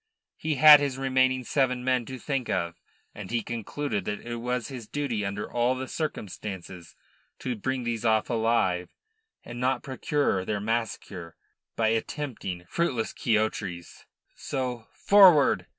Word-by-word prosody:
He 155 Hz, -1 st, -2 dB
had 150 Hz, +2 st, +10 dB
his 140 Hz, -3 st, -2 dB
remaining 130 Hz, -1 st, +2 dB
seven 125 Hz, -1 st, 0 dB
men 130 Hz, -2 st, +1 dB
to 130 Hz, -, -6 dB
think 135 Hz, -1 st, -3 dB
of, 85 Hz, -2 st, -2 dB, 0.3 s
and 100 Hz, -2 st, -8 dB
he 115 Hz, -1 st, -1 dB
concluded 120 Hz, 0 st, -3 dB
that 105 Hz, -, -3 dB
it 120 Hz, 0 st, -5 dB
was 125 Hz, +1 st, -2 dB
his 125 Hz, -5 st, -8 dB
duty 130 Hz, -7 st, -2 dB
under 100 Hz, +1 st, -3 dB
all 120 Hz, +2 st, +1 dB
the 130 Hz, 0 st, -5 dB
circumstances 95 Hz, -, -6 dB, 0.4 s
to 125 Hz, -2 st, -3 dB
bring 130 Hz, +4 st, -2 dB
these 115 Hz, -1 st, -2 dB
off 110 Hz, -1 st, +2 dB
alive, 110 Hz, -6 st, +1 dB, 0.5 s
and 120 Hz, 0 st, -8 dB
not 125 Hz, 0 st, 0 dB
procure 135 Hz, -6 st, 0 dB
their 105 Hz, +2 st, -2 dB
massacre 105 Hz, -6 st, -3 dB, 0.4 s
by 110 Hz, -1 st, +2 dB
attempting 115 Hz, -, -3 dB
fruitless 130 Hz, -, -1 dB
quixotries. 105 Hz, -6 st, -2 dB, 0.3 s
So 125 Hz, -4 st, -4 dB
"Forward!" 185 Hz, -8 st, +5 dB
120 Hz, 140 wpm, -27 LUFS, 105-130 Hz, 0.5 s, had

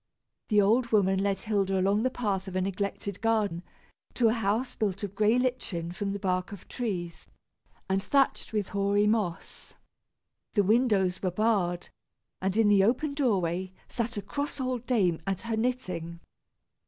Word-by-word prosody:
The 210 Hz, -2 st, +3 dB
old 230 Hz, +5 st, +3 dB
woman 195 Hz, -4 st, +3 dB
led 195 Hz, -1 st, 0 dB
Hilda 195 Hz, -3 st, 0 dB
along 200 Hz, +3 st, +2 dB
the 255 Hz, -, +2 dB
path 205 Hz, -6 st, -2 dB
of 190 Hz, -, -6 dB
a 185 Hz, -, +1 dB
neglected 200 Hz, +1 st, -3 dB
garden, 215 Hz, -6 st, +1 dB, 0.5 s
to 235 Hz, -3 st, +4 dB
a -, -, +2 dB
house 225 Hz, +2 st, 0 dB
built 200 Hz, -3 st, -2 dB
of 200 Hz, -2 st, -4 dB
gray 215 Hz, +3 st, +3 dB
lichen 245 Hz, -10 st, -1 dB
from 195 Hz, +2 st, -3 dB
the 200 Hz, -, -2 dB
bark 185 Hz, -1 st, -1 dB
of 200 Hz, -3 st, -10 dB
trees, 175 Hz, -9 st, -4 dB, 0.6 s
and 190 Hz, 0 st, +1 dB
thatched 275 Hz, +6 st, +1 dB
with 210 Hz, -3 st, -1 dB
hoary 200 Hz, 0 st, +2 dB
moss. 210 Hz, -5 st, -2 dB, 0.8 s
The 205 Hz, -, +3 dB
windows 200 Hz, -4 st, +2 dB
were 185 Hz, -, +1 dB
barred, 180 Hz, -3 st, 0 dB, 0.5 s
and 190 Hz, +2 st, 0 dB
in 225 Hz, -2 st, +5 dB
the 200 Hz, -2 st, +5 dB
open 260 Hz, +7 st, +1 dB
doorway 190 Hz, -, 0 dB
sat 235 Hz, -1 st, -3 dB
a 205 Hz, -, -3 dB
cross 285 Hz, 0 st, -4 dB
old 255 Hz, -2 st, -2 dB
dame, 185 Hz, -10 st, +2 dB
at 195 Hz, -2 st, -1 dB
her 230 Hz, -1 st, -2 dB
knitting. 185 Hz, -9 st, -2 dB
205 Hz, 165 wpm, -28 LUFS, 190-230 Hz, 0.8 s, in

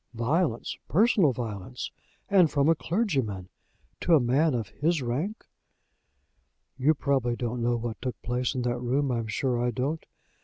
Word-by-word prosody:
Violence! 120 Hz, +2 st, 0 dB
personal 195 Hz, -, +4 dB
violence! 115 Hz, 0 st, -5 dB, 0.4 s
And 185 Hz, -5 st, +5 dB
from 140 Hz, 0 st, +2 dB
a 165 Hz, -, +6 dB
clergyman, 135 Hz, -, -1 dB, 0.5 s
to 170 Hz, -, +4 dB
a -, -, +6 dB
man 135 Hz, +4 st, +2 dB
of 115 Hz, -4 st, -3 dB
his 160 Hz, -1 st, 0 dB
rank!" 150 Hz, -, -3 dB, 1.3 s
"You 145 Hz, +4 st, +3 dB
probably 135 Hz, -4 st, 0 dB
don't 120 Hz, 0 st, -3 dB
know 120 Hz, +1 st, +2 dB
what 115 Hz, -1 st, -5 dB
took 125 Hz, -2 st, -4 dB
place 125 Hz, +2 st, -1 dB
in 125 Hz, -, -1 dB
that 120 Hz, 0 st, -1 dB
room. 130 Hz, +3 st, 0 dB
I'm 115 Hz, -2 st, -1 dB
sure 125 Hz, +1 st, 0 dB
I 125 Hz, -, +2 dB
don't. 135 Hz, +7 st, -2 dB
130 Hz, 155 wpm, -27 LUFS, 120-155 Hz, 1.3 s, a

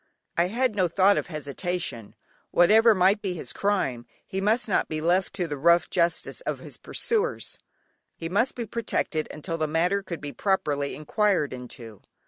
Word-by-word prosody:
I 170 Hz, +1 st, +3 dB
had 240 Hz, +2 st, 0 dB
no 185 Hz, -3 st, +3 dB
thought 195 Hz, +4 st, +4 dB
of -, -, -2 dB
hesitation, 155 Hz, -, -4 dB, 0.3 s
whatever 220 Hz, +5 st, +6 dB
might 195 Hz, +3 st, +3 dB
be 185 Hz, -3 st, -2 dB
his 125 Hz, -8 st, -4 dB
crime 140 Hz, -13 st, -1 dB, 0.2 s
he 190 Hz, -, -3 dB
must 220 Hz, +5 st, +2 dB
not 200 Hz, -, +1 dB
be 155 Hz, -, -2 dB
left 175 Hz, +4 st, +1 dB
to 180 Hz, -3 st, -1 dB
the 145 Hz, -2 st, -4 dB
rough 170 Hz, +3 st, +4 dB
justice 170 Hz, -, 0 dB
of -, -, -3 dB
his -, -, -10 dB
pursuers, 460 Hz, +1 st, -2 dB, 0.6 s
he 165 Hz, -, -5 dB
must 205 Hz, +9 st, +1 dB
be 235 Hz, -, -3 dB
protected 200 Hz, -8 st, -1 dB
until 165 Hz, +2 st, -5 dB
the 155 Hz, -, +1 dB
matter 175 Hz, +6 st, +1 dB
could 175 Hz, -4 st, -6 dB
be 145 Hz, -1 st, -6 dB
properly 145 Hz, -6 st, 0 dB
inquired 180 Hz, -1 st, +1 dB
into. 120 Hz, -4 st, -8 dB
175 Hz, 170 wpm, -26 LUFS, 155-200 Hz, 0.6 s, whatever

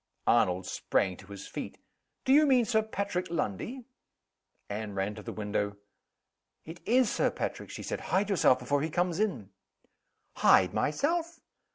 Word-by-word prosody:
Arnold 90 Hz, 0 st, +3 dB
sprang 95 Hz, 0 st, 0 dB
to 95 Hz, -, -14 dB
his 100 Hz, -1 st, -9 dB
feet. -, -, -6 dB, 0.5 s
"Do 265 Hz, -, +4 dB
you 300 Hz, +1 st, +6 dB
mean 255 Hz, -4 st, +4 dB
Sir 220 Hz, 0 st, +2 dB
Patrick 200 Hz, -4 st, -3 dB
Lundie?" 170 Hz, -, -3 dB, 0.8 s
Anne 105 Hz, 0 st, -5 dB
ran 95 Hz, +2 st, -1 dB
to 105 Hz, -, -9 dB
the -, -, -6 dB
window. 105 Hz, -1 st, -2 dB, 0.9 s
"It 165 Hz, +2 st, -9 dB
is 245 Hz, 0 st, +4 dB
Sir -, -, +2 dB
Patrick!" -, -, -4 dB
she -, -, -7 dB
said. -, -, -3 dB
"Hide 200 Hz, +2 st, +1 dB
yourself 155 Hz, -9 st, +4 dB
before 140 Hz, +3 st, 0 dB
he 160 Hz, -, -1 dB
comes 175 Hz, +2 st, 0 dB
in!" 185 Hz, -, -1 dB, 0.9 s
"Hide 90 Hz, -1 st, +5 dB
myself?" 330 Hz, -, 0 dB
160 Hz, 155 wpm, -30 LUFS, -, 0.9 s, you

